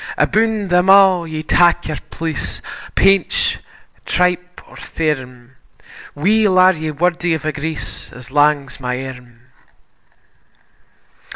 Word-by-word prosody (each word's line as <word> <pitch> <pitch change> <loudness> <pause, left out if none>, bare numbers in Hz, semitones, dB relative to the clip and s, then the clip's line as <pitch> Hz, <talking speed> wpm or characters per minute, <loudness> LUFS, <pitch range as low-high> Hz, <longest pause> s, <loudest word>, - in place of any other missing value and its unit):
Aboon 220 -2 +1
them 180 +1 +2
a' 190 -3 +5
ye 155 -1 -5
tak 175 +1 +2
your 155 -1 -4
place, 160 -2 -5 0.4
Painch, 460 - +2 0.4
tripe, 180 0 -1
or - - -16
thairm: 130 -6 -4 0.6
Weel 200 +5 +2
are 185 +1 +6
ye 160 -2 -5
wordy 170 +2 0
o' - - -4
a 155 - -1
grace 155 +2 -6
As 125 +2 -13
lang's 145 -1 +1
my 125 0 -4
arm. 125 -2 -11
160 Hz, 115 wpm, -17 LUFS, 145-185 Hz, 0.6 s, are